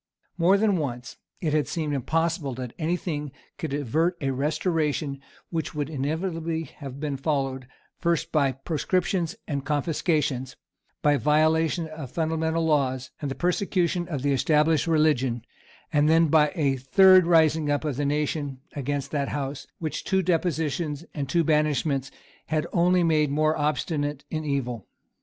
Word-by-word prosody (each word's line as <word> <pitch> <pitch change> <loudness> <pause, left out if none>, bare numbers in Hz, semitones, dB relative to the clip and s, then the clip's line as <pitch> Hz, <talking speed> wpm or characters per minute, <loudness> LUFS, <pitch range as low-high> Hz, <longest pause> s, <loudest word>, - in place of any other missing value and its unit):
More 180 +3 +4
than 205 -2 +2
once 125 -5 -4 0.2
it 155 -3 0
had 150 -4 +2
seemed 155 -3 -2
impossible 155 0 -1
that 125 -2 -6
any 170 +2 0
thing 150 -5 -4 0.3
could 160 - -3
avert 155 +6 0
a 135 -2 -1
restoration 150 0 -1 0.3
which 160 -2 -3
would 150 +1 -2
inevitably 160 +3 -2
have 140 -2 -9
been 145 -2 -2
followed, 135 -3 -2 0.3
first 170 -1 0
by 140 -4 +2
proscriptions 170 +4 -1
and 140 -2 -2
confiscations, 145 -3 0 0.5
by 150 - +5
the 145 - +1
violation 160 +2 +2
of 155 -4 -8
fundamental 160 +1 0
laws, 130 -4 0
and 145 - -2
the 135 - -4
persecution 180 -1 0
of 145 -7 -4
the 145 -1 +2
established 150 +3 +2
religion, 145 -7 +2 0.5
and 150 0 +4
then 165 0 +4
by 150 -1 +4
a 140 -5 +1
third 185 +7 +6
rising 160 -2 +4
up 145 +2 0
of 145 -4 -2
the 145 - 0
nation 145 -1 -1 0.2
against 145 0 -3
that 140 -2 -1
House 140 -1 -4
which 155 -2 -4
two 190 0 +1
depositions 165 -3 -1
and 140 -3 -4
two 170 -1 +2
banishments 150 -3 +1 0.4
had 155 -1 0
only 180 +1 +3
made 155 -3 +3
more 155 +2 +2
obstinate 145 0 -1
in 155 -1 -2
evil. 125 -7 -2
150 Hz, 150 wpm, -26 LUFS, 140-165 Hz, 0.5 s, third